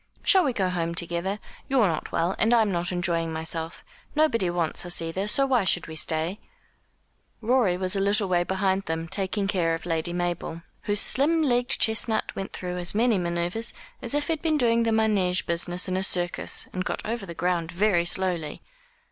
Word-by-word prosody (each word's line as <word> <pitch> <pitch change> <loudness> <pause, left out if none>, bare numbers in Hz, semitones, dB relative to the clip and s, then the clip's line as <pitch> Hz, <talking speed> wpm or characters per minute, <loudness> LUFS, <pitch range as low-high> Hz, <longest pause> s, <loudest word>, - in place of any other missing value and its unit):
"Shall 380 -2 +5
we 270 - +1
go 190 -6 0
home 170 -2 -2
together? 170 +3 -2 0.3
You're 265 -5 +4
not 165 -4 -2
well, 170 +3 0
and 225 +2 +4
I'm 220 -3 +3
not 175 0 0
enjoying 170 -2 -1
myself. 160 +1 -3 0.3
Nobody 230 - +2
wants 175 -2 -1
us, 175 -1 0
either; 165 +5 -3
so 275 +6 +2
why 255 -5 +2
should 180 -2 +2
we 160 - -8
stay?" 160 +5 0 1.0
Rorie 230 -6 +2
was 185 +1 -1
a - - 0
little 200 +1 +2
way 175 -1 +2
behind 190 +1 0
them, 165 +1 -3
taking 195 +2 0
care 170 -4 +1
of 165 - -9
Lady 165 0 -1
Mabel, 175 -1 -3 0.2
whose 205 0 +1
slim 315 +4 +3
legged 245 -3 +2
chestnut 220 0 +1
went 195 - -5
through 180 -1 -5
as 175 +3 +1
many 225 -2 +3
manoeuvres 175 +6 -2 0.3
as - - 0
if 290 0 0
he 330 - 0
had 310 - -6
been 315 -2 +1
doing 235 -3 +3
the 230 - +1
manège 210 -5 +2
business 175 +2 0
in 185 - -2
a 190 - 0
circus, 175 -2 -1
and 185 - -2
got - - -3
over 220 -2 -4
the 170 - -8
ground 175 -1 -1
very 175 -1 +2
slowly. 175 -4 -1
185 Hz, 195 wpm, -25 LUFS, 170-220 Hz, 1.0 s, Shall